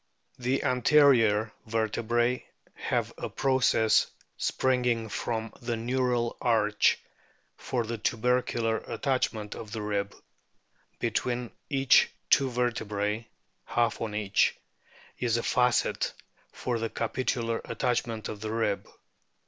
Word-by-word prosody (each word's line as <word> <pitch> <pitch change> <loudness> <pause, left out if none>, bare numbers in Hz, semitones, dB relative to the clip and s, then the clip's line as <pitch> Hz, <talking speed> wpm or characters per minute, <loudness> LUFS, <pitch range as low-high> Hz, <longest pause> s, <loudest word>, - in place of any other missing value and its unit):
The 125 +2 0
anterior 120 -5 +4
vertebras 115 +2 +1 0.3
have - - -2
a - - -4
process 130 -4 +3 0.3
springing 125 -3 +1
from 110 +1 -3
the 120 -1 -2
neural 125 0 0
arch 105 -3 +3 0.6
for 125 -2 -2
the 115 0 -4
tubercular 115 0 +1
attachment 115 -6 -1
of 110 -2 -8
the 110 -2 -3
rib; 100 -1 -2 0.8
between 120 -1 -1 0.2
each 135 -2 +5 0.2
two 135 -1 +5
vertebrae 110 -3 -1 0.4
(half 120 -1 0
on 110 -2 -3
each) 105 -2 +2 0.6
is 120 -2 +1
a 115 - -2
facet 125 -2 +1 0.4
for 120 -2 -2
the 115 0 -2
capitular 115 0 -1
attachment 115 -3 -1
of 105 - -7
the 110 0 -3
rib. 110 -3 -1
115 Hz, 110 wpm, -28 LUFS, 110-125 Hz, 0.8 s, each